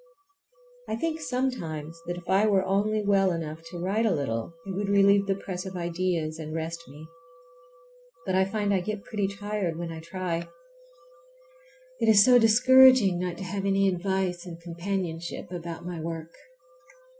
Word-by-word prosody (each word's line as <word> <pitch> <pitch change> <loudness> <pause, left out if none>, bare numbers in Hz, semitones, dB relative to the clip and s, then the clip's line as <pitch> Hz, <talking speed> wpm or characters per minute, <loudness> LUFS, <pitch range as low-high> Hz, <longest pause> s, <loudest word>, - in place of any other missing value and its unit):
I - - -1
think 320 +6 -2
sometimes 245 - -3
that 175 0 -3
if 175 - -11
I 195 +3 +3
were 195 -2 +2
only 205 +2 0
well 195 -2 +3
enough 160 -1 -4
to 175 - -8
write 200 +6 0
a - - +2
little 115 -3 -3
it 195 - -5
would 200 +1 -2
relieve 200 0 +4
the 195 - +1
press 185 -2 -6
of 190 -1 -7
ideas 170 -2 -2
and 155 0 -6
rest 165 +1 -4
me. 145 +4 -12 1.2
But 190 - -1
I 190 0 +3
find 205 0 -1
I 190 - +2
get 210 +2 -4
pretty 205 -3 -2
tired 200 -3 -3
when 170 -1 -5
I 160 - -7
try. 170 0 -4 1.5
It 225 - +2
is 205 -2 +7
so 250 -1 +7
discouraging 245 -3 +6
not 180 -1 -3
to - - -6
have 195 +2 -4
any 195 0 +2
advice 185 -1 -1
and 170 -1 -8
companionship 170 0 -4
about 170 -1 -6
my 175 -2 -5
work. 165 0 -6
185 Hz, 165 wpm, -27 LUFS, 170-200 Hz, 1.5 s, is